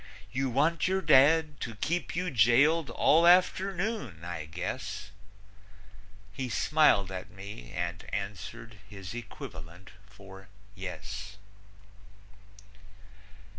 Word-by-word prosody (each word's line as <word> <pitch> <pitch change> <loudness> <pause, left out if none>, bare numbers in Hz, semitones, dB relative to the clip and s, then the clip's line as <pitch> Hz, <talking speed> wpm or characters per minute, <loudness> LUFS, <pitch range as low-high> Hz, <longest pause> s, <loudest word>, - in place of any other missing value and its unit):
"You 135 +1 -1
want 155 +8 +2
your 190 +1 0
dad 150 +1 +5
to 115 -2 -5
keep 170 +12 -2
you 180 0 -1
jailed 140 +7 +4
all 165 +3 +4
afternoon, 185 - +2
I 85 -3 -5
guess." 90 +5 -5 1.2
He 130 +3 -4
smiled 135 - +3
at 95 -1 -6
me 95 -11 -10
and 85 0 -4
answered 105 +2 -6
his 100 -2 -8
equivalent 90 -6 -9 0.2
for 95 -3 -14 0.3
"yes." 100 +2 -7
115 Hz, 95 wpm, -29 LUFS, 95-155 Hz, 1.2 s, dad